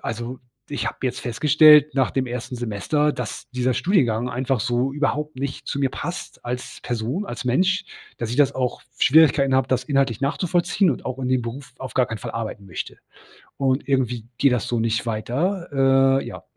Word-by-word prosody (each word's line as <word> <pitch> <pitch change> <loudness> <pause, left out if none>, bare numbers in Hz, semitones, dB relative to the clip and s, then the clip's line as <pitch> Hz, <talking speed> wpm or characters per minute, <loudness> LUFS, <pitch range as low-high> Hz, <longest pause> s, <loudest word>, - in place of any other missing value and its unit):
„Also, 120 +3 -4 0.3
ich 145 - -3
habe - - -4
jetzt 130 -2 -2
festgestellt 150 +4 +5
nach 130 -3 +2
dem 130 -1 -1
1. 125 +1 -5
Semester, 120 +6 0
dass 120 -3 -6
dieser 125 0 +1
Studiengang 125 - +1
einfach 125 0 -1
so 125 +3 0
überhaupt 150 +1 -1
nicht 140 +1 -5
zu - - -3
mir 135 - +2
passt 175 +6 -6
als 125 +1 -5
Person, 120 - -2
als 120 - -6
Mensch. 185 +9 +2 0.3
Dass 115 - -3
ich 120 - -3
das 145 -2 +3
auch 125 -2 -2 0.2
Schwierigkeiten 140 -2 +5
habe, 130 - +3
das 125 -1 0
inhaltlich 135 -5 +1
nachzuvollziehen 175 +5 +1
und 130 - -4
auch 130 0 -4
in 130 -1 -2
dem 130 -1 +2
Beruf 125 +2 -7
auf 130 - -7
gar 130 - +4
keinen 115 0 -5
Fall - - -6
arbeiten 110 -3 -5
möchte. 85 - -6 0.6
Und 135 0 0
irgendwie 125 -4 0
geht 140 - +4
das 125 -3 0
so 120 -2 0
nicht 115 +1 0
weiter.“ 135 - +2
Äh, - - -7
ja. - - -8
130 Hz, 190 wpm, -23 LUFS, 120-145 Hz, 0.6 s, festgestellt